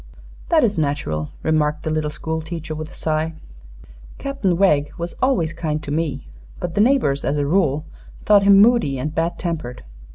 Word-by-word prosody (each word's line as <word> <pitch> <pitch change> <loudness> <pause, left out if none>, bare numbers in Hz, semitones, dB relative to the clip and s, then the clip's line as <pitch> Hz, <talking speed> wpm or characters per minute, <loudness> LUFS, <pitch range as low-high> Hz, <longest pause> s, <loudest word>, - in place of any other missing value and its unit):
"That 320 -4 +4
is 210 -7 +1
natural," 140 - -2
remarked 155 -1 +1
the 155 - -2
little 155 -1 -1
school 160 +2 -4
teacher, 160 -1 -6
with 155 0 -6
a - - -14
sigh. 160 +1 -1 0.8
"Captain 275 -11 -1
Wegg 150 -7 +3
was 170 +1 -4
always 180 - +1
kind 155 -2 -3
to 145 - -6
me; 150 -4 -2 0.3
but 170 - -4
the 205 - +2
neighbors 220 - +2
as 145 - 0
a 145 - 0
rule 155 -2 +1 0.4
thought 205 -1 +6
him 200 0 +6
moody 215 - +4
and 150 +4 -3
bad 165 +1 -1
tempered." 160 -8 -4
160 Hz, 175 wpm, -21 LUFS, 150-185 Hz, 0.8 s, thought